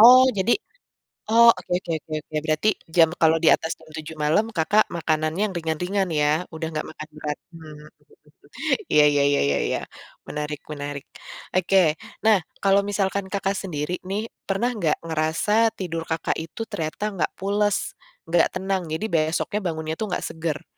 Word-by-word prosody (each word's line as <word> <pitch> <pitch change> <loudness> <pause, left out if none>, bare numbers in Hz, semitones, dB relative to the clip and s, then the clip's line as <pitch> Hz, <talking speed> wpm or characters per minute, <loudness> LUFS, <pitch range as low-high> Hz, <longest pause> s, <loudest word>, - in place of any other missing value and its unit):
Oh 250 +3 +10
jadi 190 +5 +3 0.8
oh 235 +1 +8
oke 180 -1 -8
oke 175 - -9
oke 155 - -15
oke 155 - -7
berarti 155 +6 +1 0.3
jam 165 -1 +7
kalau 160 0 +5
di 160 - +4
atas 160 - -2
jam 160 - -18
7.00 160 0 -7
malem 155 +9 +2
Kakak 205 +7 +4
makanannya 160 +1 0
yang 190 - -8
ringan-ringan 180 +4 -1
ya 150 +2 +2
udah 160 0 -4
nggak 155 - -2
makan 155 0 -9
berat, 150 -1 -4 0.2
mmm. 155 -2 -11 1.1
Iya 150 - +6
iya 145 -1 +3
iya 145 - +2
iya 70 - +2
iya - - 0 0.5
menarik 150 0 -4
menarik, 145 -1 -5 0.5
oke 185 +1 +4 0.4
nah 215 -3 +6 0.2
kalau 195 0 +5
misalkan 200 -1 0
Kakak 195 0 0
sendiri 170 -2 -3
nih, 200 +3 -2 0.2
pernah 200 +6 +1
nggak 170 -7 +1
ngerasa 165 +8 +2
tidur 165 -3 -3
Kakak 160 - 0
itu 165 +7 -7
ternyata 155 +5 -4
nggak 175 - 0
pules, 205 +1 +1 0.5
nggak 170 0 +4
tenang, 190 0 -1
jadi 160 - -2
besoknya 165 +5 0
bangunnya 160 -1 -3
tuh 220 - -1
nggak - - -2
seger? 160 -2 -4
165 Hz, 160 wpm, -24 LUFS, 155-195 Hz, 1.1 s, Oh